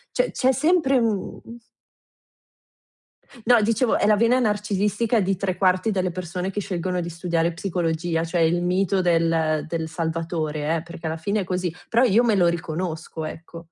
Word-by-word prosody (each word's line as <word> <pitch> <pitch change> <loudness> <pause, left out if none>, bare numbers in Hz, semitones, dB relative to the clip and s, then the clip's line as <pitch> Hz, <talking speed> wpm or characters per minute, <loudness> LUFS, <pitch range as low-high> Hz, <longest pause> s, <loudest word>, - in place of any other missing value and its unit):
Cioè - - +1
c'è 260 0 +2
sempre 300 -1 +2
un 225 -5 -1 2.1
no, 240 -3 +6
dicevo, 230 +3 +2
è - - +2
la 210 - +5
vena 230 +4 +3
narcisistica 210 +1 0
di 190 0 0
3/4 185 +1 +1
delle 185 -2 0
persone 180 +1 -4
che 205 - -3
scelgono 180 -1 -2
di 170 - -4
studiare 170 0 -1
psicologia, 165 -2 -2
cioè 170 +1 -1
il 170 +2 +2
mito 185 +2 +1
del 165 -3 +1
del 160 -1 -3
salvatore 160 -2 -2
eh, 160 - -3
perché 170 -1 -9
alla 160 - -2
fine 200 +6 -1
è - - -3
così, 180 -1 -2
però 235 +2 +3
io 235 0 +4
me 225 -3 +3
lo 175 -2 +4
riconosco, 160 -1 -4
ecco. 165 +2 -9
180 Hz, 160 wpm, -23 LUFS, 165-205 Hz, 2.1 s, no